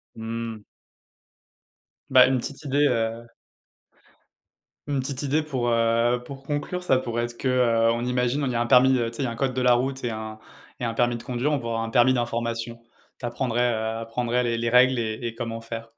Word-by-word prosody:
Mmh. 115 0 -5 1.5
Bah, 130 -1 +8
une 130 0 +2
petite 140 +4 -7
idée, 145 +1 +2
heu 115 -2 -1 1.6
une 140 -2 0
petite 135 +1 -4
idée 145 +3 +1
pour, 130 -5 -2
heu, 115 +1 +2
pour 135 +1 -9
conclure, 150 +6 -3
ça 135 -7 +2
pourrait 120 -2 -2
être 120 0 -9
que, 130 - -1
heu, 115 -3 +3
on 120 +1 -2
imagine, 125 +2 0
on - - 0
il 125 - -2
y - - -3
a 120 - +1
un 120 - +1
permis, 130 +1 +6
heu, 115 -1 -1
tu 115 - -9
sais, - - -3
il - - 0
y - - -1
a 115 - -3
un - - -6
code 130 +2 -1
de 130 - -1
la 125 -1 +5
route 130 +2 -1
et 120 - -1
un 110 0 -6 0.4
et 125 - -2
un 115 - -2
permis 120 0 +1
de - - -11
conduire, 130 +3 -1
on 150 - +2
pourrait 115 -1 -4
avoir 115 0 -1
un 115 - -4
permis 120 +2 +4
d'information, 115 -1 -2 0.4
tu - - -5
apprendrais, 120 0 0
heu, 110 0 -2
apprendrais 120 +2 -1
les 120 -1 0
les 115 0 -1
règles 125 +2 +5
et 110 -1 -2
et 115 - -6
comment 115 -1 -4
faire. 115 0 -8
120 Hz, 230 wpm, -25 LUFS, 115-130 Hz, 1.6 s, Bah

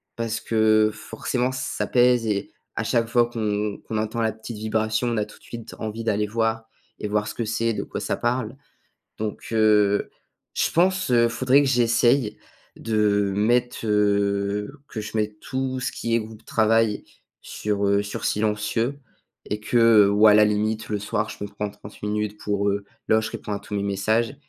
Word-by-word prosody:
Parce 115 -1 -3
que 110 -1 +3
forcément, 125 +4 -2
ça 130 0 -3
pèse 125 -2 +3
et 100 -2 -2 0.2
à - - -1
chaque 115 -1 +1
fois 120 0 +3
qu'on 105 -3 -2
qu'on 110 - -4
entend 110 +2 -2
la 110 -1 +1
petite 110 +1 -9
vibration, 110 +2 0
on 115 -2 0
a 105 - 0
tout - - -16
de - - -26
suite 115 -2 -9
envie 110 +1 -4
d'aller 105 -1 0
voir 110 0 -1 0.4
et 105 - -2
voir 105 0 0
ce - - -5
que 115 - -3
c'est, 115 +1 0
de - - -3
quoi - - -6
ça - - -1
parle. 120 +1 -1 0.6
Donc 110 -1 -5
heu, 105 -2 +3 0.5
je - - +1
pense, 185 -2 +2
heu, 120 -1 +5
il - - +3
faudrait 130 +4 +3
que 135 - +1
j'essaye 120 -1 +2 0.4
de, 115 - -4
heu, 100 -2 +2
mettre, 120 +3 +1
heu 100 0 +1 0.2
que 110 - -5
je 110 - -8
mette 105 0 -2
tout 130 -1 -3
ce - - -2
qui 115 0 -2
est - - +4
groupe 110 0 -10
travail 110 -1 +2 0.4
sur, 100 -1 -2
heu 100 +1 +3
sur 100 - -6
silencieux 110 +5 0 0.5
et 105 +1 -4
que 115 -3 +5
ou 105 +2 +5
à 105 - +8
la 105 0 +6
limite, 110 +1 -1
le 105 -1 -1
soir, 105 +1 -2
je - - -7
me 100 - -7
prends 105 +1 -3
30 100 +1 -14
minutes 105 0 -2
pour 100 0 0
heu 100 0 -2 0.2
là 110 0 +4
je 110 - -4
réponds 105 - -6
à 100 - -1
tous 105 - -8
mes 100 - 0
messages 110 +5 0
110 Hz, 195 wpm, -24 LUFS, 105-115 Hz, 0.6 s, à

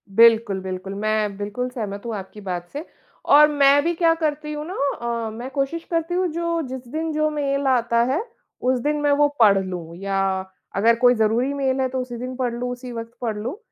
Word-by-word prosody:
बिल्कुल, 230 -3 +5
बिल्कुल। 185 +1 -5
मैं 210 -1 -1
बिल्कुल 210 +5 -3
सहमत 205 -5 -5
हूँ 230 -2 -3
आपकी 200 +2 -8
बात 175 -2 -4
से 295 +3 -5 0.5
और 300 0 +9
मैं 285 0 +5
भी 340 +1 +1
क्या 330 -1 +4
करती 300 -2 -2
हूँ 300 +1 -5
ना 370 - -5 0.5
अ, - - -3
मैं 240 +4 -7
कोशिश 290 +4 -2
करती 330 +1 0
हूँ 365 0 +2
जो 335 0 -1
जिस 255 -1 -7
दिन 315 +4 -3
जो 305 0 +1
मेल 280 -2 -1
आता 235 -2 +2
है, 320 +8 +1 0.4
उस 255 0 +1
दिन 295 +4 0
मैं 290 -1 +2
वो 290 +1 +4
पढ़ 205 -3 +6
लूँ, 170 -3 -6
या 195 0 -2 0.6
अगर 230 +4 +4
कोई 250 0 +6
ज़रूरी 230 +5 +1
मेल 270 -1 0
है 260 - +2
तो 260 0 -3
उसी 245 -1 -6
दिन 255 +1 -5
पढ़ 245 -2 -1
लूँ, 245 +1 -3
उसी 250 0 -7
वक़्त 230 0 -7
पढ़ 220 -3 -2
लूँ, 245 - -4
250 Hz, 215 wpm, -22 LUFS, 215-290 Hz, 0.6 s, और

